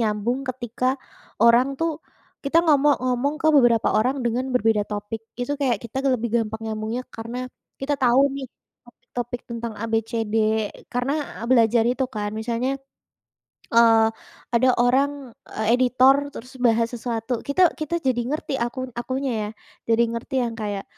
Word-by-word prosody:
nyambung 220 +3 0
ketika 255 +1 -1 0.5
orang 245 +4 +5
tuh 325 0 -1 0.5
kita 330 +5 +3
ngomong 290 -2 +4
ngomong 255 +3 0
ke - - +2
beberapa 240 -5 +4
orang 255 +5 +1
dengan 245 +3 0
berbeda 220 -3 +2
topik. 205 +1 -4 0.2
Itu 245 +4 -1
kayak 255 -4 +2
kita 235 +3 -5 0.2
lebih 235 -1 -2
gampang 220 0 -4
nyambungnya 220 +3 -3
karena 230 +2 -6 0.4
kita 290 +2 0
tahu 250 +1 +5
nih 275 -1 -5 0.4
topik-topik 245 0 -6
tentang 235 -1 -4
abcd 225 0 -2 0.6
karena 245 +3 -1 0.4
belajar 230 -2 +5
itu 255 +2 0
kan 210 -4 -4
misalnya, 245 +4 -1 0.9
eee, 225 -1 +6 0.5
ada 245 +2 +4
orang, 270 +1 +1 0.2
eee, 220 - -4
editor 255 +2 +5 0.2
terus 250 +3 -9
bahas 230 -1 +2
sesuatu. 235 0 -3
Kita 340 +5 +4
kita 310 +2 -2
jadi 255 -3 +1
ngerti 300 -1 -3
aku 250 +2 -3
akunya 260 +2 -2 0.2
ya - - -6 0.4
jadi 230 +1 +4
ngerti 235 +3 -5
yang 235 - -2
kayak. 205 -2 -3
240 Hz, 145 wpm, -23 LUFS, 225-265 Hz, 0.9 s, eee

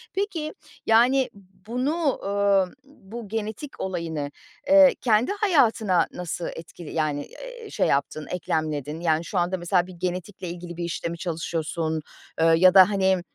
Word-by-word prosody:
Peki, 360 -6 -2 0.3
yani, 250 +4 +4 0.4
bunu, 275 +5 0
ııı, 200 -2 +2
bu 235 -5 -10
genetik 220 +6 -5
olayını, 165 -6 -3 0.4
eee, 290 -1 +7
kendi 230 - +3
hayatına 230 - +3
nasıl 175 -1 -4
etkili 165 0 -10
yani, 150 -3 -1
eee, - - -10
şey - - +1
yaptın, 140 +2 -1
eklemledin? 155 -3 -2
Yani, 165 -1 +1
şu 195 - -4
anda, 180 +2 +1
mesela, 175 +1 +1
bir 185 - -10
genetikle 180 +1 -4
ilgili 175 0 -8
bir 175 - -3
işte 170 0 -3
mi 170 - -5
çalışıyorsun, 165 -2 -2 0.4
eee, - - +5
ya 185 +2 +6
da, 190 0 +8
hani, 190 -2 +2
185 Hz, 145 wpm, -25 LUFS, 170-230 Hz, 0.4 s, da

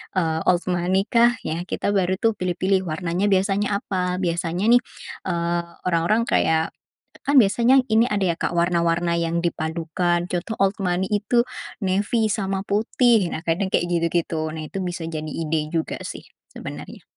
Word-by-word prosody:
eee, 160 -3 +1
old 180 -1 +3
money 180 +2 +1
kah? 235 +1 +5
Ya, 165 +2 -2
kita 200 - -2
baru 185 -1 +2
tuh 225 -2 +2
pilih-pilih, 185 +1 0
warnanya 170 +3 -1
biasanya 200 +1 +1
apa. 180 -1 -2
Biasanya 175 +3 0
nih, 245 +1 +6 0.5
eee, 170 -1 0 0.2
orang-orang 180 +7 +2
kayak, 160 0 +2 0.6
kan 285 0 +4
biasanya 240 +4 +5
ini 225 +2 +4
ada 205 -2 0
ya, - - -10
Kak, - - 0
warna-warna 170 0 +1
yang 170 +1 -1
dipadukan. 170 +2 -1
Contoh 180 +5 -2
old 195 0 +2
money 180 0 0
itu, 210 +4 +2 0.4
navy 205 +4 +1
sama 195 -2 -2
putih. 220 0 +2
Nah, 160 - -5
kadang 180 +4 0
kayak - - +1
gitu-gitu. 170 -2 0
Nah, 155 0 -6
itu 195 - -5
bisa 175 -2 -4
jadi 155 -1 -5
ide 155 -1 -2
juga 160 0 -2
sih - - -7 0.2
sebenarnya. - - -9
180 Hz, 155 wpm, -23 LUFS, 170-200 Hz, 0.6 s, nih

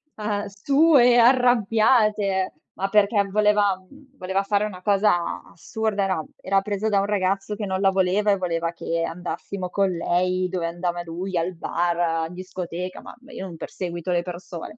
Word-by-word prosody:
ehm, 210 -1 -2
sue 250 +4 +4
arrabbiate, 225 -5 +3 0.2
ma 195 - -1
perché 205 0 +3
voleva 210 -1 +3
uhm, 275 +8 -20
voleva 190 -1 -1
fare 205 +1 +1
una 190 -4 -5
cosa 205 0 +3
a 170 -1 -4
assurda: 210 +4 -2
era 185 -5 -1
era 195 +1 +1
presa 205 +1 -2
da 205 -2 +2
un 200 - -1
ragazzo 195 0 -1
che 210 - -4
non 190 -1 -2
la 195 - +5
voleva 195 +2 +2
e 200 - +2
voleva 170 -2 -1
che 170 -1 -3
andassimo 180 +2 -5
con 195 +1 +1
lei 180 +1 0
dove 180 -2 -2
andava 175 0 -3
lui, 175 +2 -4
al 170 +2 -1
bar, 170 -1 -1
in 180 - -11
discoteca, 180 0 -6
ma - - -11
ma 265 +3 -16
io 190 - -6
non 170 -3 -9
perseguito 175 +1 -5
le 175 -1 +2
persone. 175 +2 -8
195 Hz, 175 wpm, -23 LUFS, 180-210 Hz, 0.2 s, la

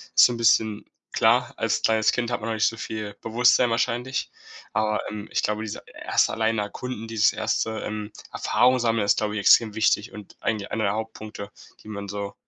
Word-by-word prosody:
ist - - +9
so - - +3
'n - - -5
bisschen 110 -2 +2 0.3
klar, - - +3
als - - 0
kleines 110 -1 +3
Kind 120 -1 -2
hat 120 - -1
man 115 - -4
noch - - -1
nicht 110 -1 +2
so 115 - -3
viel 105 -2 -5
Bewusstsein 120 +2 +3
wahrscheinlich, 120 +2 -1 0.4
aber, 110 0 0
ähm, 105 0 -7
ich - - +1
glaube, 105 +1 -1
diese 110 - -6 0.2
1. - - +2
allein 110 0 0
erkunden 115 +2 -5
dieses 115 0 +2
1., 110 0 -1
ähm, 105 0 -5 0.2
Erfahrung-sammeln 120 -3 +2
ist, 100 - +3
glaube 105 -1 -1
ich, 105 - -2
extrem 110 +1 +5
wichtig 110 -2 +1
und 105 -1 -12
eigentlich 105 -3 -2
einer 110 - -1
der 100 - +1
Hauptpunkte, 110 -2 -6 0.3
die - - -15
man 100 -1 -6
so 100 0 -5
110 Hz, 195 wpm, -24 LUFS, 105-115 Hz, 0.4 s, ist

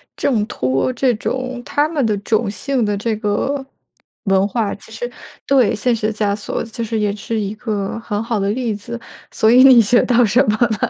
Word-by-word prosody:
挣 225 -6 0
脱 130 - 0
这 255 0 +1
种 255 +3 -4
他 290 +1 +1
们 305 -5 -1
的 215 -2 +1
种 215 +1 0
姓 255 +5 -1
的 205 -1 0
这 220 +2 -1
个 235 +6 -1 0.6
文 195 -1 +3
化。 210 0 -1
其 215 - -16
实 240 +2 -5 0.4
对， 265 -5 +4
现 235 +3 +1
实 215 -1 -1
枷 210 -2 0
锁， 205 - -4
其 230 +1 -6
实 225 - -6
是 225 - 0
也 205 -1 0
是 220 +2 -3
一 205 0 -3
个 210 -3 -3
很 210 -2 -3
好 230 0 -2
的 200 0 0
例 230 0 -1
子， 235 +4 -7 0.3
所 220 - +2
以 250 +3 +7
你 260 -3 +8
学 240 +3 +4
到 245 -1 +3
什 230 +5 +3
么 215 - +1 0.2
呢？ - - +1
225 Hz, 225 characters per minute, -18 LUFS, 205-245 Hz, 0.6 s, 你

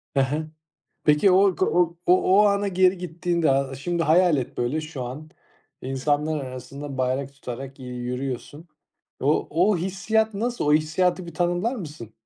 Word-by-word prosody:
Hı - - +3
hı. 150 +4 -1 0.6
Peki 150 +6 +4
o 190 0 +5
k 185 - +1
o 170 -1 +1
o 185 +3 +5
ana 200 0 +1
geri 185 0 +3
gittiğinde, 170 -2 -1
a 135 0 0
şimdi 170 +5 -2
hayal 170 0 +4
et 130 - -4
böyle 125 +6 0
şu 155 -4 -6
an, 145 +6 -7 0.5
insanlar 145 +3 -1
arasında 135 +2 -8
bayrak 130 +2 -1
tutarak, 135 0 -8
iii, 130 - -8
yürüyorsun. 130 +6 -5 0.5
O 145 +3 +1
o 180 +6 +3
hissiyat 205 +5 0
nasıl? 240 +1 -2
O 150 - +4
hissiyatı 175 +3 +1
bir 170 - -9
tanımlar 175 +8 0
mısın? 150 - -8
155 Hz, 155 wpm, -24 LUFS, 135-180 Hz, 0.6 s, o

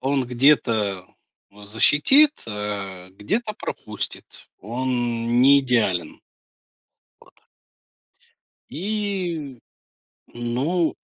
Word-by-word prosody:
он 135 0 0
где-то 115 -7 +2 0.5
защитит, 145 - +4 0.2
а 100 -3 -5
где-то 210 - -3
пропустит, - - -7
он 120 0 -2
не 140 +2 +6
идеален. 115 -9 -1 1.0
Вот. - - -21 1.4
И, 180 - -3 0.8
ну 135 +9 -1
125 Hz, 65 wpm, -22 LUFS, 105-150 Hz, 1.4 s, не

